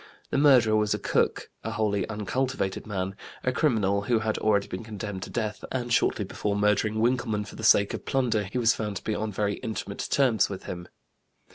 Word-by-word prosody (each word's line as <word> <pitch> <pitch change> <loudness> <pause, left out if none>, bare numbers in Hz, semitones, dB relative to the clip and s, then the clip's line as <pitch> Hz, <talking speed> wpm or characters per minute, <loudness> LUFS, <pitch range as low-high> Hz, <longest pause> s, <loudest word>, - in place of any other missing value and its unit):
The - - +1
murderer 125 -7 +6
was 105 -1 +2
a - - -2
cook, - - 0
a 115 - -3
wholly 105 -4 0
uncultivated 110 -1 -2
man, 95 -2 -2 0.3
a 125 - +2
criminal 110 -8 +2
who 115 +3 +1
had 110 0 -1
already 100 -2 +2
been 95 +5 -6
condemned 105 -3 -6
to - - -6
death, 110 -2 -3
and 120 -2 -1
shortly - - +2
before 105 -1 -2
murdering 105 +1 +2
Winkelmann 115 -3 +1
for - - -11
the 110 - -8
sake 100 -2 +5
of - - -5
plunder 120 -6 +1
he 100 +6 -5
was 115 -2 +4
found 105 -2 -4
to - - -9
be 110 - -1
on 110 0 -2
very 100 0 -1
intimate 105 -3 -4
terms 125 -8 +3
with 95 -2 -6
him. 90 -1 -6
110 Hz, 205 wpm, -27 LUFS, 100-115 Hz, 0.3 s, murderer